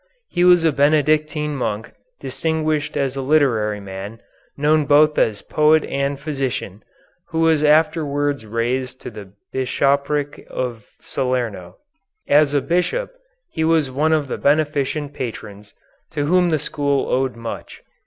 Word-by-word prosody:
He 175 - 0
was 180 -2 +6
a 160 - +4
Benedictine 150 +1 +1
monk, 110 -4 -3 0.3
distinguished 155 -2 -2
as 135 -2 -1
a 135 - -3
literary 125 -8 +2
man, 100 +3 -8 0.4
known 150 +1 +2
both 150 +1 +5
as 105 -2 +1
poet 155 +1 +3
and 140 0 -2
physician, 135 - -4 0.5
who 165 0 -2
was 160 -2 +3
afterwards 145 -3 +2
raised 125 +4 -2
to - - -7
the 100 -3 -11 0.2
Bishopric 140 +2 0
of 120 -4 -4
Salerno. 120 -9 -3 0.5
As 145 0 +4
a 140 - +3
bishop 180 - -1 0.4
he 160 - -2
was 160 -4 +2
one 150 +5 +1
of 155 -2 +2
the - - -4
beneficent 145 0 0
patrons, 105 -5 -7 0.4
to 145 -3 -1
whom 180 +3 +3
the 155 - +2
school 140 -1 -1
owed 130 -1 0
much. 115 0 -8
145 Hz, 135 wpm, -20 LUFS, 125-155 Hz, 0.5 s, was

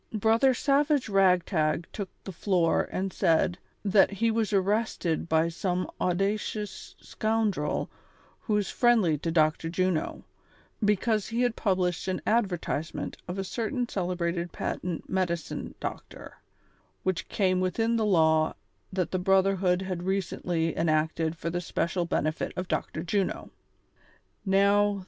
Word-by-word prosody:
Brother 225 +5 +4
SaA^age 280 -4 +2
Ragtag 175 -4 +3
took 200 -3 -4
the 195 - -6
floor 175 -2 +1
and 190 0 -2
said: 170 +2 +2 0.3
That 195 0 +5
he 225 +3 0
was 220 -1 0
arrested 195 -4 0
by 160 +1 +3
some 180 +1 -2
audacious 195 +2 -2
scoundrel 215 -9 -1 0.5
who 215 -4 0
is 205 - -1
friendly 220 - +3
to 165 - -2
Dr. 160 0 +2
Juno, 180 -2 -1 0.6
because 210 +1 +2
he 235 +2 0
had 245 -2 +1
i)ublished 185 -4 0
an 185 - -1
advertisement 185 -8 -1
of 180 - -4
a 195 - -1
certain 240 +5 -2
celebrated 175 -3 -2
patent 175 0 -4
medicine 175 -3 -2
doctor, - - -7 0.7
which 185 -2 -2
came 185 -2 +1
within 225 +6 +1
the 225 - +1
law 160 -6 +3 0.4
that 185 -3 -1
the 185 - 0
brotherhood 190 -1 +2
had 185 -2 -3
recently 175 -3 -1
en 165 0 +1
acted 160 +1 0
for 170 - -3
Hi 175 - -2
^ - - -5
special 170 +1 -1
benefit 155 -1 -1
of 180 0 -3
Dr. 160 - -2
Juno. 195 +2 -1 1.0
Kov.' 200 +1 +3
185 Hz, 135 wpm, -28 LUFS, 170-210 Hz, 1.0 s, That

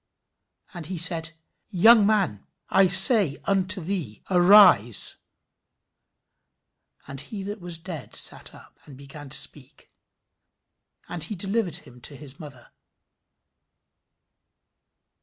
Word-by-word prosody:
And 170 -4 -9
he 185 0 -6
said, 165 -1 0 0.4
Young 215 +2 +4
man, 195 - -2 0.2
I 195 0 +3
say 190 - +4
unto 195 0 0
thee, 170 - -6
Arise. 175 - +5 1.9
And 135 -1 -7
he 195 +7 -9
that 205 +1 -8
was 175 -1 -7
dead 160 -4 -9
sat - - -1
up, - - -19
and 140 -3 -15
began 140 +1 -13
to - - +3
speak. - - -5 1.2
And 175 -3 -5
he 210 - -7
delivered 195 -2 -2
him 125 -8 -11
to 145 - -7
his 140 -1 -13
mother." 140 -6 -14
175 Hz, 110 wpm, -23 LUFS, 145-195 Hz, 1.9 s, Arise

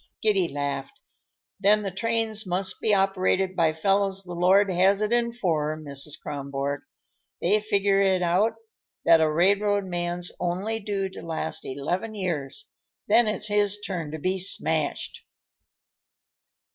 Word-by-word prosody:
Giddy 200 -5 +3
laughed. 140 -2 -4 0.6
"Then 210 +2 +4
the 195 - -3
trains 220 +1 0
must 185 +1 -2
be 220 - +2
operated 190 -1 +2
by 165 -2 +3
fellows 195 +4 0
the 175 -1 -8
Lord 190 +3 +4
has 190 +3 +3
it 215 +1 -1
in 235 -1 +1
for, 155 -9 -1
Mrs. 145 -1 -3
Kronborg. 140 0 -4 0.6
They 210 +5 +2
figure 200 -2 +2
it 190 -2 +2
out 185 +6 +2 0.5
that 165 -1 +6
a 160 - +3
railroad 200 +4 +2
man's 175 -1 -3
only 190 +6 -2
due 200 -2 -2
to 190 - -10
last 160 -1 -4
eleven 175 +11 -3
years; 180 - -3 0.4
then 240 -1 +5
it's 210 0 0
his 205 -1 +1
turn 180 -6 -4
to 155 - -5
be 185 +5 -1
smashed." 190 +2 0
190 Hz, 140 wpm, -25 LUFS, 165-205 Hz, 0.6 s, that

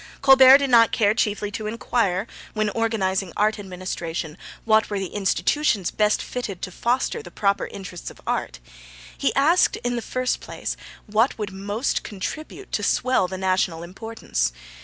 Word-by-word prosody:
Colbert 270 -1 +9
did 280 -2 -1
not 230 -2 +6
care 205 -2 +3
chiefly 210 -2 -1
to 215 0 -4
inquire, 215 -3 0 0.3
when 215 -1 0
organising 195 -5 0
art 215 +1 +2
administration, 175 -4 -5 0.3
what 220 -1 +3
were 205 - -2
the 190 -2 -4
institutions 205 - +1
best 210 0 +1
fitted 215 -7 -5
to 185 - -4
foster 250 - 0
the - - -11
proper 200 -1 0
interests 190 -3 -8
of - - -15
art; - - -2 0.6
he - - +1
asked, 320 +6 +4
in 245 0 -1
the - - -2
first 255 +2 -1
place, - - -5 0.3
what 220 +4 +1
would 210 -3 -4
most 205 +6 -2
contribute 310 - -7
to - - -1
swell 255 -7 +2
the 185 +1 -5
national 185 -3 0
importance. 180 - -3
210 Hz, 160 wpm, -23 LUFS, 190-240 Hz, 0.6 s, Colbert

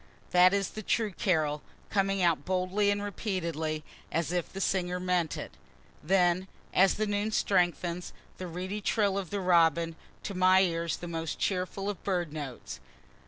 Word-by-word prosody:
that 180 +1 +7
is 200 -1 -1
a 215 - -4
true 215 +1 0
carol, 155 -7 0 0.3
coming 195 -1 +1
out 165 -5 +2
boldly 185 +4 +1
and 205 0 0
repeatedly, 170 -7 -3 0.3
as 165 0 -1
if 180 -2 -2
the 195 - -6
singer 180 -2 0
meant 180 -3 0
it.) - - -6 0.5
Then 180 +1 +2 0.3
as 190 +1 +5
the 215 - 0
noon 205 +1 0
strengthens, 180 -4 0 0.3
the 185 - -4
reedy 185 +5 -4
trill 205 -1 +1
of 195 -4 -3
the 205 - -2
robin 170 -2 +3 0.3
to 200 - -4
my 185 0 +5
ear 170 -2 0
the 175 - -6
most 165 -2 -3
cheering 185 -1 -1
of 205 -4 -4
bird 175 -6 -1
notes. 145 -5 -6
180 Hz, 165 wpm, -29 LUFS, 170-195 Hz, 0.5 s, that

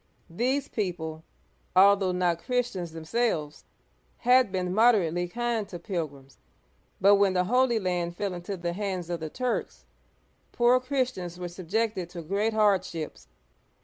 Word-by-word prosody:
These 260 +9 0
people, 160 -6 -4 0.5
al 200 +2 +8
though 195 -2 -1
not 180 -2 +1
Christians 240 -9 -2
themselves, 160 -2 -2 0.5
had 250 -3 +4
been 180 -1 -2
moderately 190 -6 +3
kind 235 +1 -2
to 175 - -6
pilgrims, 150 -7 -6 0.6
but 200 +1 +6
when 200 -1 +3
the 180 -1 +2
Holy 245 +4 +2
Land 175 -3 -2
fell 200 -2 -2
into 180 +3 -5
the 170 0 -3
hands 185 -3 -3
of 170 - -2
the 160 -1 -5
Turks, 250 +7 -3 0.7
poor 245 +1 +4
Christians 255 -10 -2
were 180 - -4
subjected 190 +1 -2
to 175 -2 -8
great 200 +7 0
hardships. 190 -7 0
185 Hz, 140 wpm, -27 LUFS, 175-225 Hz, 0.7 s, al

